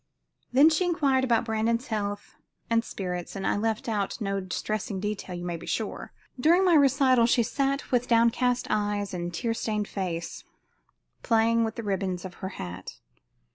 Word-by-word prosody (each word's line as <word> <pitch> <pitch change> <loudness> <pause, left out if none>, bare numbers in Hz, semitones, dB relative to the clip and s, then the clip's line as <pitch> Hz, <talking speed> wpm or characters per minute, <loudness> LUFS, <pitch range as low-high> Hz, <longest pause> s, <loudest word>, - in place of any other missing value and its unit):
She - - -42
then 290 +5 +7
inquired 290 -7 +2
about 235 -2 +2
Brandon's 230 +2 0
health 205 -2 -4 0.4
and 230 0 +3
spirits, 180 -4 -5
and 195 0 -4
I - - +2
left 220 +2 -1
out 205 -2 -2
no 195 -2 -1
distressing 195 +1 -3
detail 200 -2 -4
you 175 0 -6
may 175 -1 -3
be - - -11
sure. - - -3 0.3
During 340 +8 +4
my 360 - +4
recital 270 -4 +5
she 240 0 +3
sat 275 +4 -1
with 250 -1 +2
downcast 240 +2 +2
eyes 205 -1 -1
and 175 -1 -3
tear 225 +7 -1
stained 215 -2 -2
face, 175 -4 -4 0.8
playing 230 0 +3
with 225 0 -2
the 230 - -5
ribbons 190 -3 -2
of 185 - -7
her 190 - -3
hat. 90 0 -7
220 Hz, 170 wpm, -27 LUFS, 195-245 Hz, 0.8 s, then